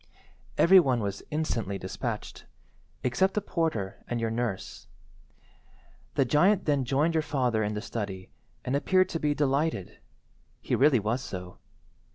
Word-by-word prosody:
"Every 190 +3 +8
one 130 -8 +2
was 100 -2 -3
instantly 115 -10 -2
despatched, - - -5 0.6
except 190 +10 +1
the - - +3
porter 135 - -2
and 120 - -2
your 115 -1 -1
nurse. 115 -4 -4 1.3
The 135 - +3
giant 185 +9 +3
then 145 -4 +1
joined 145 +6 +1
your 160 - +2
father 125 -7 0
in 105 0 -1
the 105 - -4
study, 100 -6 -5 0.3
and 125 - 0
appeared 185 +5 +3
to 165 - -3
be 150 -1 0
delighted. 145 - -1 0.6
He - - -4
really 135 -2 +5
was 110 +5 -1
so. 90 -7 -7
130 Hz, 145 wpm, -28 LUFS, 110-155 Hz, 1.3 s, Every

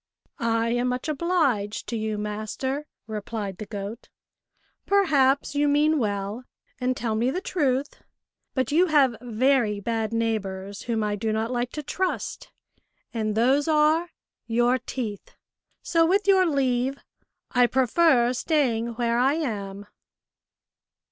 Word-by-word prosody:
" - - -37 0.3
I - - 0
am 245 +1 +1
much 250 +3 -2
obliged 290 - 0
to 235 - -2
you, 215 -1 -2
master," 215 +7 -3 0.2
replied 210 -3 -5
the 215 - -6
goat; 205 +2 -7 0.4
" - - -44
perhaps 285 -10 +3
you 290 0 +2
mean 300 +2 +3
well, 205 +1 -2 0.4
and 255 0 0
tell 235 -4 -1
me 230 +3 +1
the 315 - -1
truth, 285 -7 -1 0.5
but 260 -1 0
you 345 +5 +4
have 280 -6 +4
very 240 -2 +1
bad 225 +1 -2
neighbours, 200 -4 -2
whom 225 -2 -1
I 210 0 0
do 220 +2 -2
not 220 +2 -1
like 245 0 -1
to 300 - -5
trust, 370 +6 -3 0.6
and 215 -2 -1
those 265 +6 +3
are 315 +2 +3 0.4
your 240 +2 +2
teeth, 225 -5 -6 0.5
so, 330 -1 +3
with 395 +3 +2
your 380 -2 +5
leave, 265 -2 0 0.5
I 245 -1 +4
prefer 255 0 +3
staying 240 -5 0
where 235 0 +1
I 265 +3 +3
am." 205 -9 -4
245 Hz, 140 wpm, -25 LUFS, 220-285 Hz, 0.6 s, your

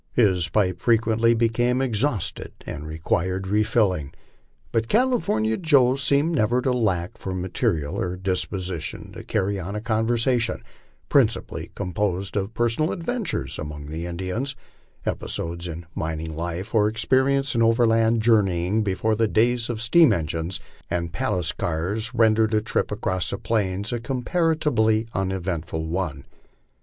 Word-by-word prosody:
His 95 -7 +2
pipe 95 -4 +1
frequently 115 0 +3
became 120 +2 +1
ex 125 -6 0
hausted 120 -9 -1
and 75 +1 -6
required 90 +4 -1
refilling, 100 - +1 0.6
but 115 0 0
California 215 - +2
Joe 140 -7 +4
seemed 140 +4 +1
never 120 -3 +2
to 130 -1 +2
lack 95 -8 -1
for 95 -1 -4
ma 90 +1 -3
terial 75 -4 0
or 90 0 -2
disposition 95 -2 -3
to - - -9
carry 100 +1 -1
on 95 +3 -5
a - - -1
conversation, 115 +1 0 0.4
principally - - +1
composed 95 +1 -2
of 100 +2 -2
per 120 - +2
sonal 155 +8 0
adventures 215 +2 -3
among 75 -1 -6
the 85 +2 -4
Indians, 95 +10 -3 0.5
episodes 85 +1 -3
in 85 0 -7
mining 80 0 -4
life, 85 +5 -4
or 105 -2 +4
experience 135 +5 +2
in 115 - +1
overland 115 -1 +3
journeying 100 -3 +2
before 105 +2 0
the 110 +1 +2
days 120 +2 +2
of 115 -2 -3
steam 160 +7 +6
engines 80 +2 -2 0.3
and 85 -1 -2
palace 95 -11 0
cars 95 +8 0
ren 110 -1 +5
dered 110 0 +2
a 105 - +3
trip 110 - -1
across 95 -5 -1
the 100 - -2
plains 100 0 -1
a 120 - -1
comparatively 125 -4 +1
uneventful 90 -4 -2
one. 80 -5 -3
105 Hz, 145 wpm, -24 LUFS, 90-120 Hz, 0.6 s, steam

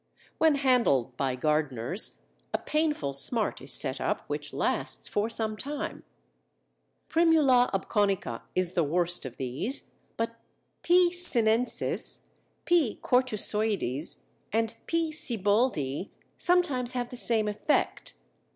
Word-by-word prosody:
When 320 -2 +4
handled 240 - +2
by 130 -1 -1
gardeners 150 - 0 0.3
a - - +3
painful 300 - -1
smart 215 - -1
is - - -3
set - - +3
up - - -1
which - - -4
lasts - - -1
for 210 +2 -1
some 220 -1 -1
time. 285 +6 -5 1.1
Primula 310 -7 +4
obconica 195 - 0
is 185 -1 +1
the 170 - +2
worst 175 0 -1
of 125 - -11
these, 135 - -1 0.3
but 230 0 -3 0.4
P. 350 0 +4
sinensis, 245 -9 +1 0.4
P. 325 -11 +2
cortusoides, 215 - 0 0.3
and 225 0 0
P. 330 -1 0
Sieboldii 205 - 0 0.3
sometimes 320 -9 +1
have 245 -1 -3
the - - -6
same 225 -3 +2
effect. 210 - -1
225 Hz, 115 wpm, -28 LUFS, 175-265 Hz, 1.1 s, When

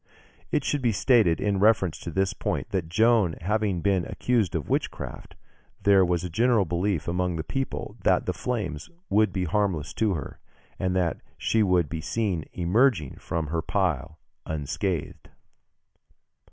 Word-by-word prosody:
It 145 - +1
should 145 0 -1
be 120 -3 +2
stated 110 -5 +3
in 100 -1 0
reference 100 -5 +3
to - - -6
this 95 +2 0
point, - - -3
that 90 -5 -2
Joan 110 -2 +3
having 100 0 0
been 95 -2 +2
accused 110 -9 0
of 80 - -2
witchcraft, - - -3 0.5
there 100 -1 +6
was 90 -1 0
a - - -2
general 115 +1 +3
belief 90 -1 -1
among 90 0 0
the 80 - -3
people 135 - -4
that - - +3
the - - -1
flames 105 -12 -3 0.2
would 105 0 +4
be 95 0 -1
harmless 90 -4 -1
to 105 -4 +3
her, 70 -4 -7 0.4
and 95 0 0
that 90 -3 0 0.2
she 110 - +1
would 90 -5 +3
be 80 +2 -5
seen 90 0 -1
emerging 90 - +2
from 85 -1 -3
her 85 +1 -1
pile 80 -5 -1 0.3
unscathed. 80 +3 -3
95 Hz, 155 wpm, -26 LUFS, 85-105 Hz, 0.5 s, there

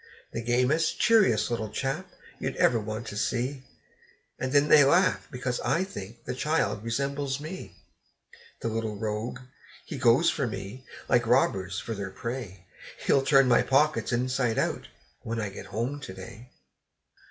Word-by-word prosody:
The 115 - -3
gamest, 125 +7 +1
cheeriest 190 - +4
little 110 -2 -2
chap, 135 +5 -3 0.3
you'd - - -3
ever 120 - +3
want 110 +2 -5
to - - -7
see! 130 +5 -2 0.7
And 130 - -2
then 145 +1 +4
they 150 -1 +8
laugh, 175 +7 +3
because 125 -2 -3
I 170 - +1
think 115 - -9
the - - -3
child 140 -5 0
resembles 140 +3 -2
me. 160 +5 -8 0.9
The - - -2
little 110 -1 -2
rogue! 110 +3 -3 0.4
he - - -6
goes 130 +8 +5
for 140 -5 -1
me, 105 +5 -7 0.2
like 120 -1 +3
robbers 100 -6 +2
for 115 - -5
their 100 -2 -4
prey; 95 -2 -6 0.4
He'll 135 - +4
turn 135 -1 +5
my 125 - +5
pockets 150 +2 +2
inside 125 -1 0
out, - - -1 0.3
when 115 0 -3
I 105 -2 -2
get 95 0 -9
home 115 +9 -3
to 95 - -8
day. 100 +6 -11
125 Hz, 155 wpm, -28 LUFS, 110-140 Hz, 0.9 s, they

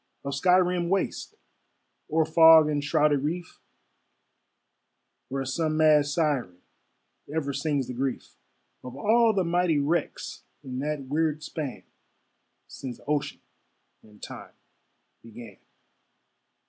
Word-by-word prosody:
Of 140 - -3
sky 180 +6 +4
rimmed 180 -1 0
waste, 195 0 -2 0.7
or 160 +1 +2
fog 160 -1 +7
enshrouded 145 -1 +1
reef, 165 +4 -4 1.7
Where 135 0 -3
some 155 +4 -1
mad 155 -2 +4
siren 145 - -1 0.7
ever 145 -3 -2
sings 140 -1 -1
the 125 - -7
grief 130 +1 -3 0.5
Of 125 0 -9
all 225 +9 +3
the 195 -3 0
mighty 175 -2 +1
wrecks 150 +4 -2 0.2
in 130 -1 -6
that 150 0 -3
weird 155 +2 -1
span 150 -4 -6 0.8
Since 130 -3 -8
ocean 145 -1 -2 0.6
and 105 -1 -20
time - - -9 0.7
began. 115 -3 -12
150 Hz, 110 wpm, -26 LUFS, 135-165 Hz, 1.7 s, fog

